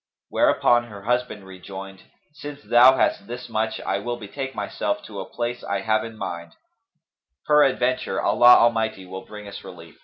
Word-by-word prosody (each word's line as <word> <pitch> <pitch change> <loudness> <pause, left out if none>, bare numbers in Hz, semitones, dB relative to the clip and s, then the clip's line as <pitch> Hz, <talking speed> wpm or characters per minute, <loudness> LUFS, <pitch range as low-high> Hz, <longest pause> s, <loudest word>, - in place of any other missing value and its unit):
'" - - -69
Whereupon 120 0 +3
her 105 -4 -11
husband 120 -3 -2
rejoined, 95 +1 -10 0.3
"Since 145 0 -9
thou 125 +2 +6
hast 100 - 0
this 125 +1 -7
much 110 0 -2
I - - -2
will 120 0 -4
betake 135 +5 -7
myself - - -3
to - - -9
a - - -7
place 120 0 -4
I 100 -1 -2
have 110 +1 +1
in 115 -1 -9
my 95 -4 -4
mind; 85 0 -15 0.9
peradventure 130 -7 +2
Allah 120 0 +6
Almighty 110 -4 +1
will 95 +1 -9
bring 105 -1 -10
us 100 - -9
relief." 85 -4 -13
110 Hz, 175 wpm, -23 LUFS, 95-125 Hz, 0.9 s, thou